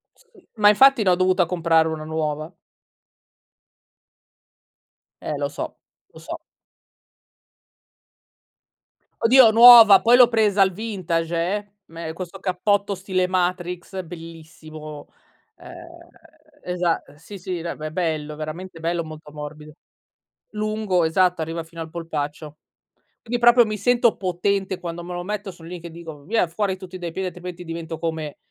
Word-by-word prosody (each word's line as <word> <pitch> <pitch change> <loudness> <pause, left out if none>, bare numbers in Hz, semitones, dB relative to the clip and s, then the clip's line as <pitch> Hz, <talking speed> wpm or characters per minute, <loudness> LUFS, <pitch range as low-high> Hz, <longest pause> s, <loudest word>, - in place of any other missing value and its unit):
Sì, 450 -7 -25
ma 210 -1 +5
infatti 265 +2 +5
l'ho 185 -2 +4
dovuta 185 0 +2
comprare 165 -2 +2
1 160 -1 -5
nuova. 155 0 -3 2.7
Eh - - -4
lo - - -1
so, - - -7 0.4
lo - - -14
so. - - -7 2.8
Oddio 245 0 +7
nuova, 230 -3 +9
poi 235 +2 +5
l'ho 250 -1 +7
presa 215 -4 +2
al 190 - +4
vintage 175 -5 -3
eh, 200 +4 -2
me 165 0 -7
questo 185 +2 -8
cappotto 200 +2 0
stile 185 -1 -1
Matrix 180 0 -2
bellissimo. 155 -2 -11 0.5
Ehm, 340 0 -13 0.6
esa 180 -2 -1
Sì, 165 +7 -11
sì, 180 -2 -5
be 165 -2 -5
è - - -5
bello, 155 -3 -3
veramente 165 +3 -7
bello, 170 +1 -2
molto 155 -1 -11
morbido. 150 0 -9 0.8
Lungo, 215 -4 -1
esatto, 180 +2 +2
arriva 165 +1 -4
fino 165 0 -11
al 165 - -6
polpaccio. 155 -2 -6 0.6
Quindi 240 +1 -3
proprio 240 0 +6
mi 215 -1 -4
sento 240 +2 +2
potente 190 +1 -2
quando 170 -1 -6
me 180 +1 -7
lo 175 0 -5
metto 205 +1 -5
sono 170 -2 -14
lì 175 0 -8
che 170 0 -9
dico: 160 -3 -10
"Via 205 +3 0
fuori 190 +3 -2
tutti 185 0 -9
dai 175 -2 -6
piedi 190 +2 -3
altrimenti 180 0 -8
divento 165 -1 -6
come 160 -3 -4
180 Hz, 135 wpm, -22 LUFS, 165-200 Hz, 2.8 s, nuova